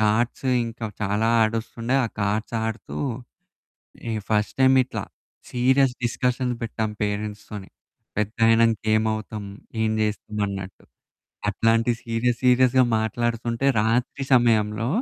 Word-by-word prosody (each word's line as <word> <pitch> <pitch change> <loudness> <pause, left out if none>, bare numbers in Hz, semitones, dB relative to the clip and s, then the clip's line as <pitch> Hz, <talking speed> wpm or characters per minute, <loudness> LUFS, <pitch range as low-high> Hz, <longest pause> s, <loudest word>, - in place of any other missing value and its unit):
Cards 115 +5 +1 0.2
ఇంకా 115 0 -6 0.2
చాలా 105 +2 0 0.2
ఆడొస్తుండే, 115 +2 -1
ఆ - - 0
కార్డ్స్ 105 +3 -1
ఆడుతూ, 110 +1 -5 1.1
ఈ - - -1 0.2
ఫస్ట్ 105 -1 +1
టైమ్ 130 0 +6
ఇట్లా 125 - -5 0.5
సీరియస్ 130 +1 +3
డిస్కషన్స్ 125 +1 0
పెట్టాం 110 -1 -2
పేరెంట్స్‌తోని 105 -1 -4 0.5
పెద్దయినాక 115 +2 +3 0.2
ఏమవుతాం, 110 -1 -1 0.4
ఏం 110 - +1
చేస్తాం 105 0 -3
అన్నట్టు. 95 -1 -7 0.7
అట్లాంటి 115 +3 +2
సీరియస్, 115 +1 0
సీరియస్‌గా 125 0 +5
మాట్లాడుతుంటే 115 +3 -1
రాత్రి 120 +5 0
సమయంలో 110 -2 +2
115 Hz, 105 wpm, -24 LUFS, 105-120 Hz, 1.1 s, టైమ్